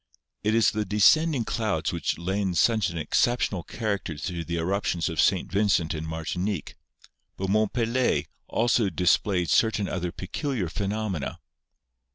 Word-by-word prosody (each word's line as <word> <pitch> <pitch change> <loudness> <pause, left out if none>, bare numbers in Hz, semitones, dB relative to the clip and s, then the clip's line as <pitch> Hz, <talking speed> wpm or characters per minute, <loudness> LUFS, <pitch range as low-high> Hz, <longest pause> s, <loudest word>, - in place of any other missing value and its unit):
It 105 +1 +2
is 105 -3 +4
the 110 0 -1
descending 120 - +3
clouds 105 -10 -1
which 85 - -1
lend 95 +1 -1
such 110 +3 +3
an 85 - -6
excep 120 +9 +2
tional 90 -5 -2
character 100 -8 -3
to 85 +3 -4
the 85 +2 -3
eruptions 90 0 -1
of 80 -2 +1
St. 95 -1 +1
Vincent 95 -5 +2
and 80 0 -5
Mar 80 0 -5
tinique, 90 -2 -3 0.6
but 95 0 -3
Mont 110 0 +2
Pelee 120 +1 +1 0.2
also 115 -2 +2
displayed 90 +1 +1
certain 110 -3 +2
other 90 -1 -3
peculiar 105 - -3
phenomena. 100 -4 -3
95 Hz, 150 wpm, -26 LUFS, 85-110 Hz, 0.6 s, is